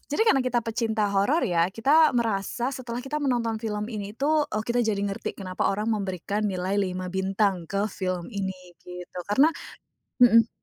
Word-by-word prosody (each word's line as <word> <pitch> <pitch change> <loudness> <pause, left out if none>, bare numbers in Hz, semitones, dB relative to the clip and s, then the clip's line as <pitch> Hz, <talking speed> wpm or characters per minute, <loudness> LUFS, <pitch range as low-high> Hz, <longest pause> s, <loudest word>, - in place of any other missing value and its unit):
jadi 295 - +2
karena 270 -12 +4
kita 250 -2 0
pecinta 220 -2 0
horor 230 +12 +2
ya, 175 -5 +2
kita 285 +9 +4
merasa 235 +3 -1
setelah 245 -2 -5
kita 300 +2 -3
menonton 235 -5 0
film 210 -2 -3
ini 205 0 -6
tuh, 300 +2 +2
oh 215 0 -2
kita 240 +1 +1
jadi 215 -4 0
ngerti, 195 -1 -4
kenapa 185 -2 -2
orang 210 +3 -1
memberikan 200 0 -2
nilai 185 +1 -2
5 185 -1 -3
bintang 190 -2 0
ke 200 +1 0
film 185 -2 -3
ini 190 -2 -3 0.2
gitu 180 0 -9
karena 270 +10 +5 0.7
mhm. 230 -2 +7
210 Hz, 170 wpm, -26 LUFS, 190-240 Hz, 0.7 s, mhm